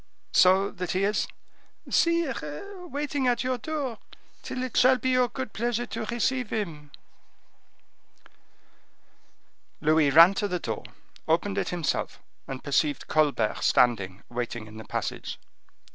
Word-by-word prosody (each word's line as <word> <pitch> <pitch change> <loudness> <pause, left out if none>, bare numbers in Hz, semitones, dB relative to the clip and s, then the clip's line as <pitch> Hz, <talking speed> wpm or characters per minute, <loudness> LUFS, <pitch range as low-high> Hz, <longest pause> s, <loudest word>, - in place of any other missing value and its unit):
"So 190 +2 +5
that 180 -1 -4
he 185 +1 +1
is—" 205 +2 +1 0.6
"Sire, 335 - -1
waiting 285 -3 -2
at 240 -1 +1
your 255 -1 -1
door, 275 -4 -4 0.4
till 255 - -4
it 255 - -5
shall 255 +1 +6
be 260 +1 -1
your 255 -1 +3
good 260 -1 -6
pleasure 240 +1 -1
to 230 -2 -5
receive 240 +1 -1
him." 160 -9 -4 2.9
Louis 155 -1 +3
ran 165 +6 +8
to 205 +1 -1
the 180 -2 -1
door, 110 -10 -5 0.4
opened 190 +5 +1
it - - -2
himself, 170 -3 -2 0.3
and 135 -1 -6
perceived 145 0 0
Colbert 145 -8 +1
standing 100 -6 +2
waiting 120 -2 -4
in 110 0 -12
the 110 - -9
passage. - - -4
200 Hz, 130 wpm, -27 LUFS, -, 2.9 s, ran